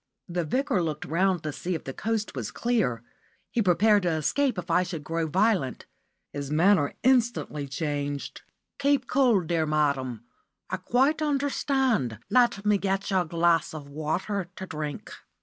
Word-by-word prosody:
The 175 -1 -2
Vicar 210 - 0
looked 155 -3 -3
round 180 +1 +1
to 155 - -2
see 180 +4 -3
if 160 - -5
the 135 - -6
coast 220 +3 -2
was - - -4
clear. 215 - 0 0.5
He 235 - +1
prepared 205 +2 +4
to 180 - 0
escape 200 - 0
if 175 -1 -4
I 180 - +4
should 175 -4 -5
grow 165 +1 -2
violent. 185 - +1 0.5
His 140 -1 -4
manner 160 0 +3
instantly 240 - +1
changed. 145 0 -3 0.4
"Keep 280 -2 +2
cool, 245 -6 +3
dear 165 -1 0
madam. 140 -6 0 0.5
I - - 0
quite 275 +6 +1
understand. 270 - 0
Let 240 -5 +3
me 210 -1 +3
get 195 +1 -1
you 190 - +3
a 180 - 0
glass 165 0 +1
of 145 -2 -8
water 170 +6 -2
to 190 - -6
drink." 150 -4 -6
180 Hz, 160 wpm, -27 LUFS, 150-225 Hz, 0.5 s, prepared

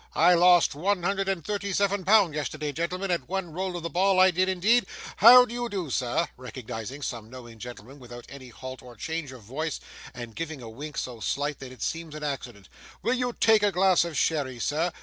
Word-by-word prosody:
I 175 +3 +6
lost 175 0 +5
one 180 +5 -1
hundred 195 +1 0
and 185 -5 -2
thirty 200 -1 -3
seven 200 -1 +1
pound 195 -4 +4
yesterday, 150 0 -3
gentlemen, 180 +5 -3
at 170 -1 -2
one 190 -3 -3
roll 185 +1 -3
of 170 - -7
the 170 - -3
ball, 185 +3 +3
I 185 0 +7
did 185 +2 +1
indeed! 210 +6 +3 0.3
how 250 +3 +9
do 235 - -9
you 240 0 -3
do, 185 - -4
sir?' 125 -1 0
(recognising 125 +1 -7
some 115 -4 -5
knowing 120 -3 -11
gentleman 125 +3 -10
without 120 -1 -11
any 135 -2 -11
halt 130 +2 -9
or 125 -1 -13
change 160 +3 -4
of 130 -4 -12
voice, 145 +8 -4 0.3
and 120 -3 -9
giving 160 -3 -5
a 115 -3 -9
wink 145 +6 -8
so 120 -3 -4
slight 145 +5 -2
that 135 -2 -9
it 130 -4 -8
seems 165 -2 -4
an 155 - -7
accident), 120 -9 -5 0.4
'will 235 - +2
you 250 -1 -1
take 220 -2 +5
a 205 -1 +3
glass 185 -1 +4
of 170 -4 -5
sherry, 140 -6 0
sir? 155 +8 0
160 Hz, 215 wpm, -27 LUFS, 130-190 Hz, 0.4 s, how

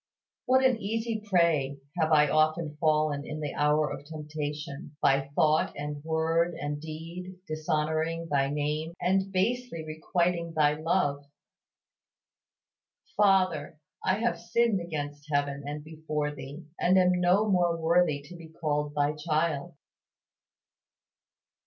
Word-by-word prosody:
What 260 +1 +4
an 255 -3 +4
easy 225 +1 -2
prey 170 -8 +2 0.2
have 160 0 +2
I 150 -1 +6
often 155 0 +1
fallen 155 -2 +1
in 155 +1 -6
the 150 -2 -3
hour 150 0 +2
of 135 - -8
temptation 150 0 -6
by 135 0 +2
thought 155 0 +3
and 145 0 -5
word 165 +1 +1
and 145 -1 -4
deed 165 +4 -7
dishonoring 155 +1 -1
Thy 140 -3 +1
name 150 +3 -2
and 190 +2 +1
basely 200 -2 -1
requiting 170 +2 -1
Thy 150 -1 +4
love! 150 -3 0 1.9
Father, 185 -7 +2 0.3
I 185 - +2
have 235 +2 0
sinned 230 -5 +1
against 145 -3 -5
heaven 145 -1 0
and 150 +1 -5
before 155 -1 -3
Thee, 140 +4 -9
and 185 +2 +4
am 180 -1 +5
no 185 +5 +4
more 175 -4 +2
worthy 165 -3 +2
to 155 +5 -11
be 165 -1 -11
called 150 -2 -2
Thy 145 0 +2
child! 155 +1 -1
155 Hz, 125 wpm, -28 LUFS, 150-175 Hz, 1.9 s, I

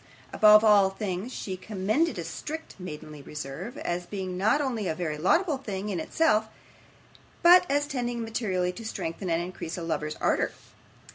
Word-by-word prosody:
Above 215 0 +7
all 205 -3 +6
things 195 +3 -4
she 190 -6 -5
commended 215 - 0
a 170 - -3
strict 305 - -6
maidenly 150 -4 -8
reserve, 150 - -7
as 175 0 -3
being 190 -3 -4
not 210 +10 +2
only 240 -8 -1
a 160 - -1
very 155 -3 -2
laudable 290 - +2
thing 205 -4 -4
in 185 -4 -2
itself, 220 - +2 1.0
but 355 +1 +7
as 290 +1 +2
tending 245 -4 -3
materially 195 -6 -1
to 205 +5 -9
strengthen 185 -4 -4
and 165 +1 +1
increase 175 -2 -6
a 170 - -5
lover's 155 -2 -2
ardour. - - +1
195 Hz, 160 wpm, -27 LUFS, 175-240 Hz, 1.0 s, Above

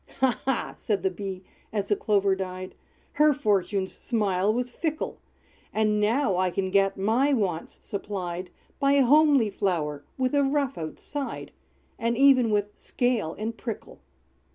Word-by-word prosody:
"Ha, 255 -3 +2
ha!" 265 -2 -1
said 200 -4 -1
the 190 - +1
Bee, 190 0 -6 0.3
as 205 -2 -2
the 205 - +4
Clover 200 -2 +2
died, 185 -1 -5 0.4
"Her 300 0 +4
fortune's 200 -5 0
smile 205 -4 0
was 245 +2 -2
fickle! 315 +3 -3 0.5
And 215 -1 +1
now 210 -1 +2
I 185 0 +2
can 190 +1 -2
get 195 0 +3
my 235 +9 +2
wants 190 -9 -1
supplied 185 -3 -4 0.3
By 280 0 +3
a 280 -2 +5
homely 285 -5 +5
flower, 155 -7 -1
with 255 0 0
a 285 - +4
rough 275 -1 0
outside. 265 - -5 0.5
And 230 0 0
even 265 -3 +6
with 205 -1 0
scale 240 -10 -1
and 220 +2 -3
prickle!" 225 -1 -7
210 Hz, 150 wpm, -26 LUFS, 190-260 Hz, 0.5 s, even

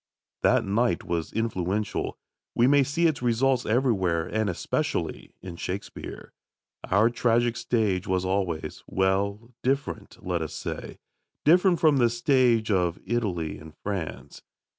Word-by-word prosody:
That - - +3
night 105 -1 +1
was 85 -2 -2
influential. 105 -2 -2 0.4
We 120 - +4
may 140 +2 +5
see 145 +6 +1
its 155 -6 +2
results 125 +1 +2
everywhere, 100 -9 +1
and 110 -2 -1
especially 90 - -2
in 90 -3 -7
Shakespeare. 95 +3 -6 0.6
Our 105 +5 +4
tragic 120 0 +2
stage 105 -8 0
was 95 0 0
always 90 -5 -2
well, 100 +5 0
different, 135 +2 -2
let 90 -2 -1
us 80 - -4
say - - -6 0.5
different 175 +2 +5
from 155 -4 +4
the 125 - +4
tragic 120 0 0
stage 120 -4 +3
of 90 -2 +1
Italy 90 -10 -2
and 80 0 -13
France. 95 -7 -5
110 Hz, 135 wpm, -26 LUFS, 90-125 Hz, 0.6 s, may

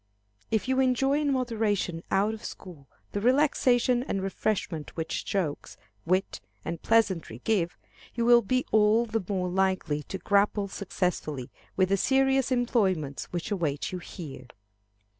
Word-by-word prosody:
If 220 +2 0
you 260 0 +1
enjoy 265 +2 +2
in 290 -1 +1
moderation 220 -9 0
out 200 +3 +2
of 220 - -9
school 160 -8 -9 0.2
the 205 - -2
relaxation 250 -1 +3
and 195 -6 -2
refreshment 190 -5 -2
which 160 - -2
jokes, 170 -7 -3 0.3
wit, 185 +3 0 0.2
and 165 -1 -4
pleasantry 190 - +1
give, 185 -6 0 0.4
you 235 -1 0
will 240 0 +7
be 255 +4 0
all 215 +2 +4
the 225 -2 -2
more 185 -2 0
likely 185 -5 0
to 190 - -6
grapple 200 +2 +2
successfully 180 -9 -3 0.3
with 185 -1 +3
the 195 - +3
serious 270 +3 +2
employments 195 - 0
which 175 +3 -5
await 160 -7 -1
you 180 - -4
here. 145 -7 -9
200 Hz, 140 wpm, -28 LUFS, 175-240 Hz, 0.4 s, will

